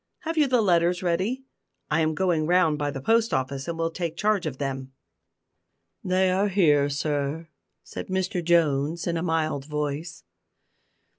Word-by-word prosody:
Have 325 0 -3
you 305 -3 +3
the 250 -3 +3
letters 175 -1 +2
ready? 190 +10 -1 0.5
I 155 +2 +3
am 155 0 +1
going 170 -3 +1
round 170 -4 +3
by 145 -1 -1
the 135 -2 -5
post 225 - +2
office, 135 +2 -3
and 170 -1 -3
will 165 0 -1
take 165 -1 -4
charge 205 -4 +1
of 135 -4 -5
them." 135 -1 -4 1.1
"They 185 0 +2
are 195 +3 +2
here, 150 -8 +3
sir," 145 +2 -2 0.3
said - - -7
Mr 185 -1 -1
Jones, 160 -1 +2
in 170 - -1
a 165 - -1
mild 155 -5 -1
voice. 150 - -4
165 Hz, 160 wpm, -25 LUFS, 145-185 Hz, 1.1 s, you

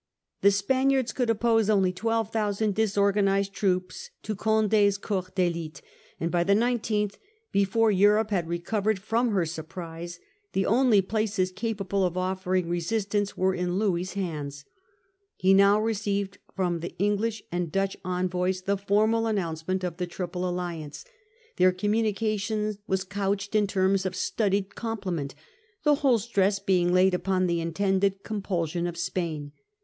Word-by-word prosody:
The 200 - +7
Spaniards 260 +5 +1
could 245 -3 0
oppose 225 -1 +2
only 190 -3 +3
12,000 220 0 0
disorganised 200 -1 +2
troops 185 -2 -1
to 215 - -3
Conde's 215 -1 +2
corps 190 -3 -3
<LMte\ 175 -4 -1
_. - - -13 0.4
and 165 +1 -1
by 175 -1 +2
the 200 +3 +3
1 240 +2 +2
Qth, 210 -2 -1 0.3
before 205 +3 +3
Europe 210 +2 +3
had 175 -5 0
recovered 200 +5 -1
Franche 190 - -18
from 235 +2 +2
her 180 -3 +2
surprise, 165 +1 -7 0.3
the 195 - +1
only 230 -3 +4
places 205 -2 0
capable 200 -1 -2
of 180 -1 0
Comte. 185 +1 0
offering 185 -1 0
resistance 200 +4 -1
were 190 +1 +2
in 180 0 -1
Louis's 185 -3 0
hands. 145 -7 -4 0.7
He 190 +1 +3
now 200 +2 +6
received 200 -2 -1 0.2
from 175 -3 0
the 170 - -7
English 205 +3 0
and 175 -2 -2
Dutch 195 +1 0
envoys 180 0 -1
the 200 +1 0
formal 215 +3 +2
announcement 185 -2 -2
of 175 -2 -3
the 180 - -2
Triple 180 0 -3
Alliance. 170 -4 -5 0.5
Their 185 0 +5
com 185 +3 -1
munication 215 -1 0
was 190 0 0
couched 200 +1 -2
in 210 -1 +3
terms 190 0 +1
of 185 - -5
studied 200 0 0
compliment, 185 -11 -4 0.5
the 295 -1 +5
whole 260 -5 +4
stress 200 -2 +1
being 185 -3 +2
laid 185 +1 +4
upon 185 0 +1
the 170 -1 0
intended 195 +3 0
compulsion 175 -5 -2
of 170 -1 -5
Spain. 160 -4 -3
195 Hz, 150 wpm, -27 LUFS, 180-210 Hz, 0.7 s, The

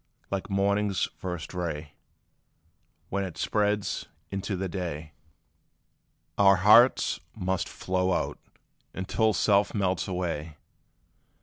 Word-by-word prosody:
Like 100 0 -3
morning's 100 0 +1
first 90 -3 -5
ray, 80 -4 -4 1.2
When 100 0 -1
it 90 -4 -6
spreads 105 -1 0 0.2
into 100 0 -3
day, 85 -5 -5 1.3
Our 100 -1 +7
hearts 105 +7 +5 0.2
must 95 -1 -1
flow 95 0 -1
out, - - -1 0.6
until 110 +4 +1
self 100 0 +2
melts 95 -3 0
away! 85 -4 -3
95 Hz, 95 wpm, -28 LUFS, 90-100 Hz, 1.3 s, Our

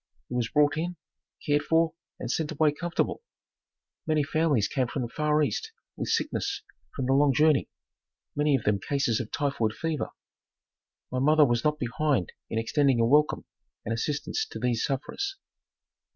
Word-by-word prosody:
He - - -6
was 120 -2 0
brought 145 0 +3
in, 175 +3 -2 0.5
cared 145 0 +3
for 165 0 +2 0.3
and 120 - -3
sent 155 0 -1
away 155 0 +3
comfortable. 175 - -2 0.9
Many 155 -2 +2
families 150 -7 +2
came 130 -3 0
from 130 +1 -3
the - - -2
far 150 +1 +1
east 130 -8 -2 0.2
with - - -4
sickness - - -1 0.3
from 130 - -2
the 135 - +2
long 140 -1 +4
journey, 150 -1 +4 0.7
many 150 -1 +3
of 125 - -1
them 105 -1 +2
cases 135 -4 0
of 115 - -4
typhoid 135 -7 0
fever. 160 +1 -2 1.0
My 130 - -1
mother 150 +3 +5
was 120 -2 +1
not 150 0 +2
behind 125 - 0 0.2
in - - -2
extending 135 +2 +2
a 115 - +4
welcome 150 +5 +3 0.4
and 115 - -1
assistance 145 - -1
to - - -8
these 120 -2 0
sufferers. 385 - -2
145 Hz, 165 wpm, -27 LUFS, 125-155 Hz, 1.0 s, mother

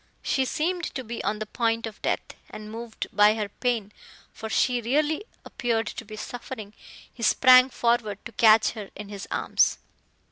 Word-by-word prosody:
She 265 - +1
seemed 340 +6 -1
to 260 - -3
be 235 0 -6
on 210 - -1
the 215 - -4
point 230 +1 -1
of 220 -2 -9
death, - - -2 0.2
and 215 0 -9
moved 230 0 -6
by 210 +1 +5
her 210 -2 -3
pain 225 -2 -2 0.4
for 220 - -7
she 245 +2 +1
really 300 - 0 0.2
appeared 230 -2 -1
to 225 - -6
be 215 0 -10
suffering, 220 -2 -7 0.4
he 240 - -13
sprang 255 +2 +6
forward 235 -5 0
to - - -7
catch 220 -1 +5
her 210 -4 -8
in 205 0 -8
his 200 -1 -7
arms. - - +2
230 Hz, 175 wpm, -26 LUFS, 215-250 Hz, 0.4 s, sprang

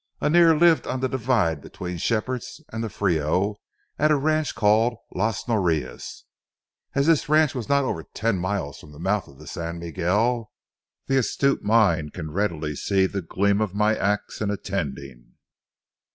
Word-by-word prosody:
Annear 165 +1 +5
lived 170 -1 +4
on 130 - -2
the 130 - 0
divide 110 - 0
between 90 +2 -7
Shepherd's 120 - -2
and 110 +1 -3
the 115 - -3
Frio 95 +2 0 0.4
at 155 - +4
a 155 - +5
ranch 155 +2 0
called 110 +3 +3 0.2
Las 105 +2 -1
Norias. 85 - -1 0.7
As 140 - +2
this 155 -3 +3
ranch 155 -1 +4
was 125 -5 -5
not 140 0 +3
over 85 -11 -2
ten 105 +3 -2
miles 90 -6 -3
from 75 - -14
the 75 - -13
mouth 95 +3 0
of 70 - -16
the 75 - -13
San 85 +3 -5
Miguel, 105 +8 0 0.5
the 135 - +1
astute 140 +2 +1
mind 100 -8 +2
can 80 -4 -6
readily 80 -5 -1
see 95 +5 +1
the 100 +1 -3
gleam 100 +4 +1
of 105 -3 -2
my 105 +1 +3
ax 100 +1 -1
in 105 - 0
attending. 70 -11 -5
105 Hz, 165 wpm, -24 LUFS, 85-125 Hz, 0.7 s, Annear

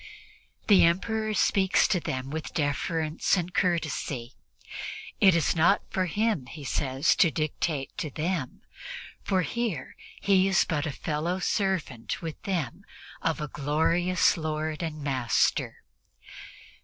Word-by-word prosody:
The 200 -3 +6
Emperor 215 +5 +1
speaks 190 -2 +3
to 185 - +2
them 130 -3 -4
with 160 0 -5
deference 155 +3 0
and 180 0 -3
courtesy. 155 -8 -1 0.9
It 190 -6 +6
is 165 0 +2
not 170 +5 +4
for 185 -1 0
him, 205 - 0
he 150 +1 -9
says, 135 +3 +1
to 170 - +5
dictate 155 -2 -2
to 155 - -2
them, 155 -2 -3 0.6
for 185 -2 +1
here 225 - -3 0.2
he 195 -1 +4
is 190 -2 +3
but 155 -2 -1
fellow 155 +5 -2
servant 185 - -1
with 165 -3 -6
them 170 -11 -3 0.4
of - - 0
a 150 - -3
glorious 165 +7 +2
Lord 155 0 -2
and 155 -3 -4
Master. 130 -4 0
165 Hz, 125 wpm, -27 LUFS, 150-185 Hz, 0.9 s, The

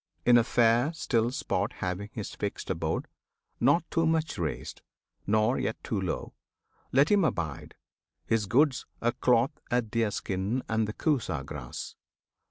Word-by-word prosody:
In 120 - +7
a 120 - +6
fair, 120 +4 +3
still 120 -8 +1
spot 125 - -1
Having 95 +3 -4
his 105 - -5
fixed 100 -2 -4
abode, 80 -3 -2 0.5
not 145 +7 +4
too 165 0 +2
much 160 - 0
raised, 80 -3 -4 0.5
Nor 110 +4 +3
yet 110 - -1
too 105 -4 -2
low, 90 -4 -3 0.6
let 140 +4 +4
him 205 -2 +5
abide, 80 - -2 0.5
his 110 -3 +1
goods 135 +4 +3
A 120 - +2
cloth, 125 0 +3 0.2
a 120 -1 +2
deerskin, 105 0 -1
and 110 -1 +1
the 105 - -4
Kusa 110 - 0
grass. 70 -4 -7
115 Hz, 145 wpm, -29 LUFS, 100-130 Hz, 0.6 s, In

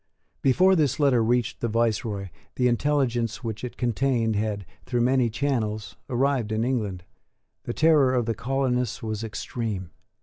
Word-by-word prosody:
Before 185 +9 +4
this 145 -5 +1
letter 135 -5 +4
reached 120 0 0
the 120 - -1
viceroy 110 -3 -1 0.3
the 125 - +2
intelligence 120 -3 0
which 110 -1 -4
it 125 - -6
contained 120 -2 +1
had, 105 -2 -2 0.2
through 120 -2 0
many 125 0 +3
channels, 110 -4 -2
arrived 130 -3 +1
in 110 +1 0
Ireland. 105 -8 -2 0.6
The 120 - -3
terror 155 -5 +5
of 120 -2 +1
the 115 - 0
colonists 125 -2 -1
was 110 -1 -3
extreme. 105 -4 -4
120 Hz, 145 wpm, -25 LUFS, 110-130 Hz, 0.6 s, terror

